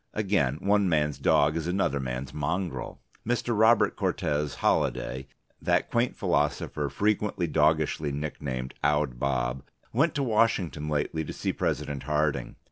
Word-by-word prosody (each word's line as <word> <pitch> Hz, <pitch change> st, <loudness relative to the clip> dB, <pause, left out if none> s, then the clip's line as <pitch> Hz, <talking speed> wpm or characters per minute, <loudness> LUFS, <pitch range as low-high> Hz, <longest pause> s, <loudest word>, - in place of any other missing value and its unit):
Again, 95 Hz, -11 st, +1 dB
one 100 Hz, -1 st, +3 dB
man's 75 Hz, -3 st, +1 dB
dog 75 Hz, +2 st, +3 dB
is 80 Hz, 0 st, -2 dB
another 90 Hz, -6 st, 0 dB
man's 65 Hz, 0 st, -4 dB
mongrel. 85 Hz, +5 st, -3 dB, 0.2 s
Mr. 120 Hz, 0 st, 0 dB
Robert 110 Hz, +2 st, +4 dB
Cortes 75 Hz, -1 st, -1 dB
Holliday, 65 Hz, +1 st, 0 dB, 0.3 s
that -, -, +1 dB
quaint 120 Hz, +1 st, +1 dB
philosopher 75 Hz, -2 st, 0 dB
frequently 105 Hz, +3 st, 0 dB
doggishly 75 Hz, -1 st, +2 dB
nicknamed 70 Hz, -3 st, -4 dB
Owd 75 Hz, -4 st, +1 dB
Bob, 65 Hz, -1 st, -1 dB, 0.3 s
went 150 Hz, +7 st, +2 dB
to 140 Hz, -, 0 dB
Washington 105 Hz, -, +1 dB
lately 75 Hz, +2 st, -1 dB
to -, -, -6 dB
see -, -, -2 dB
President 70 Hz, -2 st, -2 dB
Harding. 75 Hz, -1 st, 0 dB
75 Hz, 130 wpm, -27 LUFS, 70-100 Hz, 0.3 s, Robert